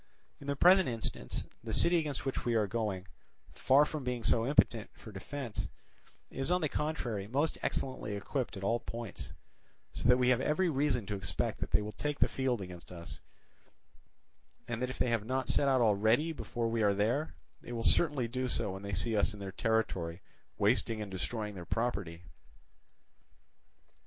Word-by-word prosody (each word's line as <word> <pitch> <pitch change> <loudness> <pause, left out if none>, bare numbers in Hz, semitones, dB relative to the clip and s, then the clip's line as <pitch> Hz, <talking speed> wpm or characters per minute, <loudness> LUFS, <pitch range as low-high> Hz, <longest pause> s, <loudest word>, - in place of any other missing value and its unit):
In 140 - -10
the 140 - 0
present 185 +2 +6
instance, 110 - -3 0.2
the 110 -2 -2
city 170 0 +5
against 150 -5 -2
which 135 - -2
we 120 -1 +1
are 110 -2 +3
going, 100 -3 -2 0.5
far 140 +3 +5
from 150 -2 -5
being 125 -2 -2
so 115 +1 +3
impotent 120 -6 +3
for 110 - -11
defence, 120 +4 -5 0.6
is 135 +3 -2
on 180 +1 +2
the 155 - +1
contrary 120 -11 -2
most 140 +8 0
excellently 110 -5 -2
equipped 115 +2 -3
at 95 - -7
all 115 +4 +2
points; 115 0 -7 0.6
so 120 - 0
that 125 - +7
we 125 0 +3
have 125 0 +3
every 170 +5 +2
reason 135 -5 +1
to 105 - -3
expect 100 0 -2
that - - -3
they 105 - +2
will 105 - -5
take 145 +7 -3
the - - +4
field 130 -4 -1
against 90 -2 -9
us, 85 -1 -8 1.5
and 120 0 -3
that 125 - 0
if 130 - -6
they 125 - +1
have 115 -3 +1
not 130 +2 -1
set 140 - +3
out 130 -2 +4
already 110 +8 +3
before 120 -6 -3
we 115 0 0
are 100 -2 +3
there, 115 +10 0 0.3
they - - -9
will 115 -1 -3
certainly 145 -3 +3
do 130 +2 -2
so 105 - -1
when 95 +1 -6
they 100 0 -5
see 110 +5 +2
us 105 +1 +2
in - - -11
their 100 -1 -5
territory 95 -6 -1 0.3
wasting 110 +1 +2
and 100 - -9
destroying 105 +4 -3
their 90 -3 -7
property. 95 -6 -2
115 Hz, 185 wpm, -32 LUFS, 105-135 Hz, 1.5 s, that